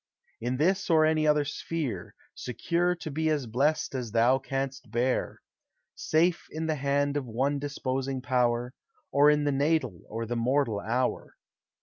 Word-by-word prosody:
In 125 +2 -2
this 185 +7 +1
or 160 -2 +5
any 155 0 +2
other 150 -1 +3
sphere, 150 -1 -4 0.2
Secure 175 +7 -1
to 160 -2 -7
be 160 +2 0
as 150 -4 0
blest 135 +8 0
as 120 -5 -4
thou 120 +3 +4
canst 135 -2 -4
bear; 120 +3 -1 0.5
Safe 165 +2 +1
in 160 +1 -4
the 160 - +1
hand 140 0 0
of 135 -3 -3
one 135 +5 0
disposing 135 -2 -3
Power, 125 -1 0 0.4
Or 145 +1 +6
in 150 0 +3
the 145 - +1
natal 140 - 0
or 115 +1 -4
the 120 +2 -3
mortal 120 -2 +1
hour. 120 +5 -2
140 Hz, 155 wpm, -28 LUFS, 125-155 Hz, 0.5 s, Or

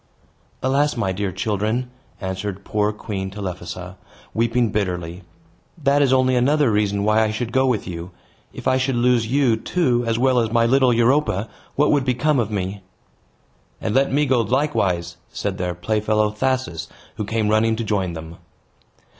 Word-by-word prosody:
"Alas! 140 +2 +1
my 95 -5 0
dear 95 +1 -2
children," 110 +6 -1 0.3
answered 95 0 -4
poor 105 0 +1
Queen 100 -2 -5
Telephassa; 90 -2 -6 0.4
weeping 115 0 +1
bitterly, 90 -4 -2 0.6
"that 145 -2 +2
is 135 -2 +3
only 130 -1 +3
another 140 +1 +3
reason 100 -1 +1
why 110 +1 +3
I 110 - +2
should 115 +2 -3
go 130 +1 +2
with 120 -5 0
you. 85 -1 -6 0.4
If - - -6
I 130 - +3
should 130 0 0
lose 120 -1 +2
you, 130 -2 +3
too, 125 0 0
as 115 0 +1
well 130 0 +3
as 115 -2 0
my 115 0 +3
little 130 +1 +4
Europa, 120 -3 +2 0.3
what 150 +1 +3
would 145 -2 +3
become 130 +3 +1
of 110 -3 0
me!" 100 -1 -3 1.0
"And 110 - -2
let 135 +1 +3
me 145 +2 +2
go 130 -3 +3
likewise!" 95 - 0
said 100 -1 -3
their 90 -1 -2
playfellow 105 +3 +1
Thasus, 125 -6 -1 0.3
who - - -2
came 110 0 -1
running 110 +1 +3
to 115 - -3
join 100 -5 -1
them. 80 +1 -8
110 Hz, 165 wpm, -21 LUFS, 100-130 Hz, 1.0 s, little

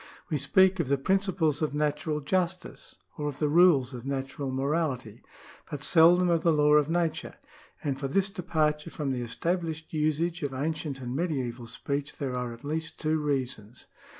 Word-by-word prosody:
We 150 - +1
speak 190 +7 +4
of 165 - 0
the 140 +1 +2
principles 185 -1 +1
of 150 -2 -1
natural 150 +1 -1
justice, 180 +4 -2 0.2
or 150 - -1
of 145 -2 -4
the 150 - +1
rules 150 -6 +5
of 120 -2 -7
natural 135 0 -3
morality, 130 -4 -2 0.5
but 145 -2 -6
seldom 175 +3 +5
of 170 -2 +2
the 165 - +3
law 150 -1 +4
of 150 0 +4
nature, 170 -1 -1 0.5
and 135 -2 -2
for 135 - -2
this 195 +7 +1
de 195 -3 -5
parture 155 -2 0
from 145 -3 -3
the 125 -2 -2
established 165 +6 -3
usage 155 +3 0
of 140 -3 -3
ancient 145 -1 -3
and 125 0 -4
medieval 130 -8 -2
speech 140 +4 -4
there 130 -3 -3
are 125 -1 -3
at 115 0 -11
least 160 +3 -4
two 155 0 +1
reasons. 130 -6 -3
150 Hz, 180 wpm, -28 LUFS, 135-165 Hz, 0.5 s, rules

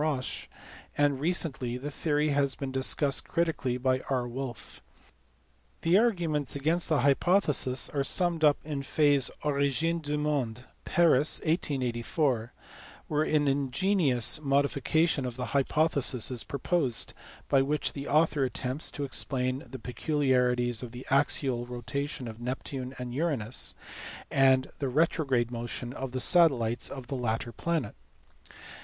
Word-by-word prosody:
Roche, 145 -5 -2 0.5
and 145 -2 +2
recently 140 -6 0
the 145 +4 -6
theory 150 +1 0
has 140 -2 +1
been 135 -1 -5
discussed 135 +1 +1
critically 160 -7 -1
by 130 0 +1
R. 125 -3 0
Wolf. 120 -4 -7 1.0
The 165 +2 +3
arguments 170 - +1
against 160 +5 0
the 155 -3 +2
hypothesis 140 -2 +3
are 140 -2 -1
summed 170 +2 0
up 150 -1 +5
in 145 -2 -4
Faye 145 +1 +2
s 130 - +1
Oriyine 150 +3 0
du 150 0 -2
monde, 135 -5 -2 0.2
Paris, 160 -5 +3
1884, 130 -5 -1 0.6
where 150 0 0
an 150 -1 +2
ingenious 140 - +2
modi 140 0 +2
fication 155 0 +1
of 120 - -6
the 125 0 -4
hypothesis 140 -3 +1
is 125 -2 -1
proposed, 140 -3 -1 0.3
by 135 - +4
which 145 +2 -1
the 140 0 -6
author 150 -1 +2
attempts 130 +3 -1
to 145 - -5
explain 130 +2 -1
the 130 - -7
peculiarities 125 -2 0
of 125 -2 -8
the 125 +1 -9
axial 135 -3 +1
rotation 125 +3 -4
of 115 +1 -9
Neptune 130 +1 -4
and 125 -1 -6
Uranus, 130 -6 +1 0.6
and 130 -1 +3
the 140 - -1
retrograde 135 -4 +1
motion 120 +1 -5
of 135 -1 -5
the 130 - -3
satellites 125 -8 +3
of 135 -2 -7
the 135 - -5
latter 120 -1 -2
planet. 165 -5 -2
135 Hz, 135 wpm, -29 LUFS, 125-150 Hz, 1.0 s, up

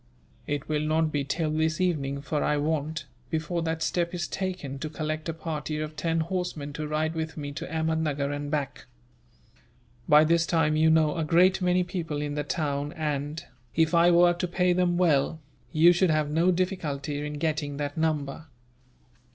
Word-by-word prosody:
"It 145 0 -3
will 150 -1 0
not 155 +1 +1
be 145 -2 0
till 155 +3 -1
this 155 0 0
evening, 140 -6 0
for 150 +1 -1
I 150 - +1
want, 155 0 -1 0.2
before 160 +3 -2
that 160 0 -2
step 175 0 -1
is 175 -1 -2
taken, 180 -8 -4
to 155 - -4
collect 155 +1 -3
a - - +1
party 155 -1 -4
of 155 0 -4
ten 165 +2 0
horsemen 165 -4 -3
to 150 +1 -4
ride 155 +1 -1
with 160 -1 -4
me 145 -1 -4
to 145 - -6
Ahmednuggur 160 -3 -1
and 145 0 -5
back. 145 -3 -3 1.2
By 150 +1 +8
this 165 +1 +2
time 160 -2 +2
you 160 +1 +4
know 160 0 +3
a 165 - 0
great 180 +5 +4
many 180 0 +3
people 170 -4 -4
in 145 0 -3
the 150 0 -2
town 145 -2 -2
and, 150 +1 -3 0.3
if 160 +1 +2
I 170 +1 +6
were 175 0 +6
to 175 +1 -2
pay 180 0 +2
them 175 -1 +1
well, 160 -3 +2 0.3
you 170 +2 +6
should 175 +1 +2
have 155 -2 +1
no 165 +4 +3
difficulty 155 -6 -2
in 150 0 -4
getting 150 -1 -2
that 145 0 -3
number." 155 -1 -1
155 Hz, 185 wpm, -27 LUFS, 150-170 Hz, 1.2 s, By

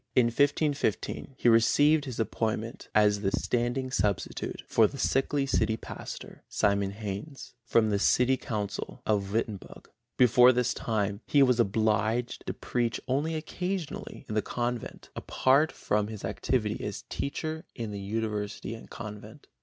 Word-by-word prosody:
In 125 - +6
1515 140 - 0
he - - +1
received 145 +7 +5
his 125 -4 -6
appointment 110 0 -2
as 105 -1 +4
the 95 - +1
standing 120 +4 -1
substitute 105 -7 -1
for 110 -2 +5
the 140 - -9
sickly 135 +1 +1
city 110 -4 +1
pastor, - - -8
Simon 100 -1 +1
Heinse, 105 +7 -6
from 110 -2 +3
the 100 - +1
city 125 +5 +4
council 105 -6 -4
of 100 -2 0
Wittenberg. 110 -2 -4 0.3
Before 125 0 +7
this 125 0 +1
time 105 -2 -1
he 145 -1 +5
was 125 -2 +3
obliged 110 +2 +1
to - - -1
preach 120 -2 -1
only 145 +5 0
occasionally 180 -2 -4
in - - -5
the 110 - +2
convent, 120 +2 -4
apart 140 +4 +2
from 105 0 0
his 110 -2 -6
activity 110 -5 -1
as - - -4
teacher 155 +4 -4
in 115 -3 -4
the 100 -1 -5
University 105 +1 -3
and 115 - -10
convent. 110 +4 -9
115 Hz, 145 wpm, -29 LUFS, 105-130 Hz, 0.3 s, Before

